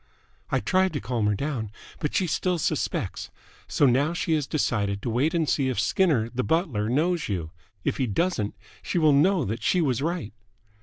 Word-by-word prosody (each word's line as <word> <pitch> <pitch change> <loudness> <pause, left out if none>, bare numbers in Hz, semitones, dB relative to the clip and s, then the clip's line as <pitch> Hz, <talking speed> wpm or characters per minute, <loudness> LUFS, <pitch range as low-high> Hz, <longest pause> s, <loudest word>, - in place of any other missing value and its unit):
"I - - +1
tried 190 0 +2
to - - -1
calm 115 0 -1
her 105 - +2
down, 125 -3 -3 0.3
but 150 - -2
she 190 - +2
still 180 +2 0
suspects. 160 - -2 0.4
So - - +2
now 140 +5 +3
she 170 -1 -1
has 150 -3 0
decided 105 -9 0
to 120 - -1
wait 140 +9 +1
and 165 -2 +1
see 135 -2 +1
if 125 - -1
Skinner, 120 - +2
the 125 +1 -1
butler, 145 - 0
knows 165 +5 +1
you. 85 -5 -3 0.3
If - - -1
he 130 - 0
doesn't, 110 - -1 0.3
she - - -3
will 155 -3 +5
know 165 +2 +3
that 110 +3 -3
she 180 - +2
was 135 -7 +1
right." 165 - -2
140 Hz, 195 wpm, -26 LUFS, 115-170 Hz, 0.4 s, will